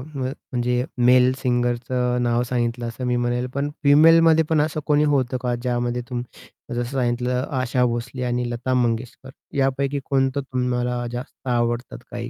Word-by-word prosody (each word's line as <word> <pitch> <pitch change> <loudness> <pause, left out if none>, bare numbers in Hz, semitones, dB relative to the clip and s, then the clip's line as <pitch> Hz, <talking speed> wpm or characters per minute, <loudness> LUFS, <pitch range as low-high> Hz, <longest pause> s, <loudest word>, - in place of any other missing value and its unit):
म 135 - -2
म्हणजे 125 -2 -2 0.2
मेल 125 0 +6
सिंगरचं 125 0 0
नाव 120 0 +1
सांगितलं 120 -1 -1
असं 115 +2 -5
मी 125 - +1
म्हणेल, 120 +1 -1
पण 140 +1 -1
फिमेलमध्ये 160 +2 +6
पण 155 -2 +3
असं 155 0 -1
कोणी 150 0 +4
होत 130 -2 +1
का 125 -1 0
ज्यामध्ये 120 0 -2
तुम्ही 120 -1 -8
जसं 120 - 0
सांगितलं 125 +1 0 0.2
आशा 125 0 +1
भोसले 120 +2 -3
आणि 120 0 -1
लता 120 +2 -2
मंगेशकर 120 +1 -1 0.3
यापैकी 135 +1 0
कोणतं 135 0 +1
तुम्हाला 125 -1 -1
जास्त 125 +1 -8
आवडतात 120 - -1
काही? - - -5
125 Hz, 150 wpm, -22 LUFS, 120-130 Hz, 0.3 s, मेल